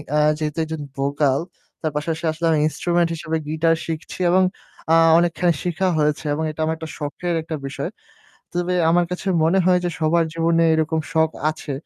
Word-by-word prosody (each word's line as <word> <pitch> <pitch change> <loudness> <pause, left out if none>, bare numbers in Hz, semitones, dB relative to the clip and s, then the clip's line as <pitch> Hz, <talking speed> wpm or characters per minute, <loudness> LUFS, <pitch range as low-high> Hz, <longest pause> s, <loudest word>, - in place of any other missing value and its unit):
আ - - +3 0.2
যেহেতু 155 0 -3
একজন 160 -1 -5 0.2
vocal, 140 0 +1 0.4
তার 155 - -1
পাশাপাশি 160 +2 -2
আসলে 160 +2 -4
আমি 155 - +3
instrument 175 +2 +1
হিসেবে 160 0 -2
guitar 160 +2 +2
শিখছি 165 +2 -5
এবং, 185 +1 +5 0.5
আ - - +6 0.2
অনেকখানি 175 0 +2
শিখা 180 +2 0
হয়েছে 150 0 0
এবং 155 +2 -2
এটা 155 - -16
আমার 160 +1 0
একটা 160 0 -7
শখের 160 +4 -3
একটা 160 0 -4
বিষয়। 135 - -4 0.6
তবে 175 +1 -1 0.2
আমার 175 +1 +4
কাছে 180 +2 -4 0.2
মনে 170 +4 +3
হয় 180 -1 +5
যে 175 - 0
সবার 165 +2 +3
জীবনে 165 0 +2
এরকম 160 0 +1
শখ 160 0 +3 0.2
আছে। 155 -2 -7
160 Hz, 175 wpm, -21 LUFS, 155-170 Hz, 0.6 s, আ